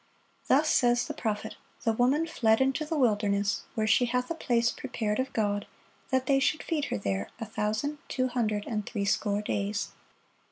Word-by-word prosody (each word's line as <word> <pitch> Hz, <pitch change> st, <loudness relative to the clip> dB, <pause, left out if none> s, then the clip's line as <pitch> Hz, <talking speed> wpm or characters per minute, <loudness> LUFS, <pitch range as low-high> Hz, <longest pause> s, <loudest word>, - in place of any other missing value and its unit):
Thus 290 Hz, +4 st, +4 dB
says 240 Hz, -4 st, +3 dB
the -, -, -5 dB
prophet: 220 Hz, -1 st, -3 dB, 0.3 s
"The 225 Hz, -, +2 dB
woman 260 Hz, +8 st, +2 dB
fled 225 Hz, -9 st, +2 dB
into 270 Hz, +3 st, +1 dB
the 315 Hz, +1 st, -2 dB
wilderness, 205 Hz, -5 st, +1 dB
where 220 Hz, -, +1 dB
she 220 Hz, +4 st, +4 dB
hath 250 Hz, +3 st, -1 dB
a -, -, +2 dB
place 235 Hz, -7 st, +1 dB
prepared 220 Hz, -5 st, -3 dB
of 260 Hz, +1 st, -1 dB
God, 205 Hz, -2 st, 0 dB, 0.4 s
that 260 Hz, -1 st, +1 dB
they 270 Hz, 0 st, +3 dB
should 300 Hz, +3 st, +1 dB
feed 305 Hz, -4 st, -1 dB
her -, -, -2 dB
there 100 Hz, -1 st, -2 dB
a 225 Hz, -, -3 dB
thousand 220 Hz, +7 st, -2 dB
two 255 Hz, -1 st, 0 dB
hundred 215 Hz, -4 st, -1 dB
and 215 Hz, -2 st, -2 dB
threescore 205 Hz, -1 st, 0 dB
days." 200 Hz, 0 st, -1 dB
230 Hz, 175 wpm, -29 LUFS, 210-265 Hz, 0.4 s, Thus